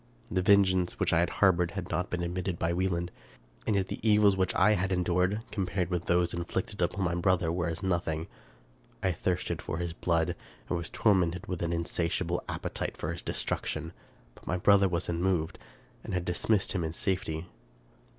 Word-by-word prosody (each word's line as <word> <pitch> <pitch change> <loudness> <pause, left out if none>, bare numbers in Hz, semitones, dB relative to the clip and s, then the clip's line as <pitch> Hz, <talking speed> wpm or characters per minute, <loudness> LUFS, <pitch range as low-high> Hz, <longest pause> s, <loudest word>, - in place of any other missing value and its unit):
The 95 - +1
vengeance 95 -2 +4
which - - +1
I 80 - +5
had 85 - +2
harbored 90 -3 +3
had 90 -2 -4
not 90 - -1
been 90 -1 -2
admitted 90 0 -2
by 85 +1 0
Wieland; 85 -1 -1 0.6
and 105 - +2
yet 95 -1 +1
the - - -5
evils 105 -2 +5
which 95 -1 0
I 105 +4 +5
had 95 -2 +1
endured, 90 +3 +1
compared 95 -3 -1
with 90 -1 -1
those 85 -1 +2
inflicted 90 +3 -3
on 95 +3 0
my 90 -1 +1
brother, 85 -1 +2
were 85 +1 -1
as 85 +1 -4
nothing. 85 -4 0 0.8
I 95 - +3
thirsted 90 +1 -2
for 80 - -4
his 85 -1 -3
blood, 85 0 0 0.3
and - - 0
was 85 -1 -4
tormented 90 -5 +2
with 90 -2 -4
an 85 -1 0
insatiable 85 +1 -1
appetite - - -3
for 75 - -3
his 85 - -5
destruction; 80 +2 -3 0.4
but - - -19
my 90 - 0
brother 100 +1 +5
was 85 0 -1
unmoved, 85 -1 0 0.4
and - - -4
had 90 -1 -1
dismissed 95 +3 +1
him 90 -4 -1
in 80 0 -3
safety. 90 -3 -2
90 Hz, 185 wpm, -30 LUFS, 85-95 Hz, 0.8 s, I